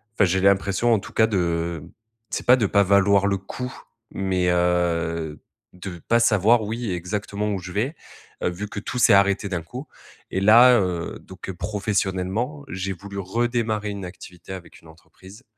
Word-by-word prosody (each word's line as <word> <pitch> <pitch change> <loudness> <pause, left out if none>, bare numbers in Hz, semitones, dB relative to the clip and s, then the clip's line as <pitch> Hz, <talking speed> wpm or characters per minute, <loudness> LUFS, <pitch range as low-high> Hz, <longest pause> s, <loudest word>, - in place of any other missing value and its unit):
enfin 105 - +4
j'ai 95 +1 +1
l'impression 100 +4 +2
en 110 - +3
tout - - -11
cas 110 - +4
de 85 -5 -1 0.5
c'est - - -3
pas 125 - +8
de 110 - +1
pas 100 +1 +3
valoir 100 +1 +4
le 100 -1 +1
coup, 125 +6 -6 0.4
mais, 95 -2 -1
heu, 85 -3 0 0.3
de 90 -1 -8
pas 115 0 +4
savoir 110 +1 +4
oui, 115 +1 -4
exactement 100 +3 -3
où 95 - -2
je 90 0 -8
vais, 125 - -1 0.5
heu, - - +2
vu 95 +4 -5
que 100 - -5
tout 125 +4 -5
s'est - - +6
arrêté 100 +1 +3
d'un 90 -3 -2
coup. 125 - -8 0.4
Et 95 - 0
là, 120 +3 +7
heu, 90 -3 -3
donc, 95 0 -11
heu, - - -3
professionnellement, 105 - -2
j'ai 95 +1 -3
voulu 100 +2 -10
redémarrer 110 +1 -1
une 100 -2 -5
activité 90 0 -10
avec 90 -2 -11
une 85 - -18
entreprise 95 +7 -16
100 Hz, 175 wpm, -23 LUFS, 90-110 Hz, 0.5 s, pas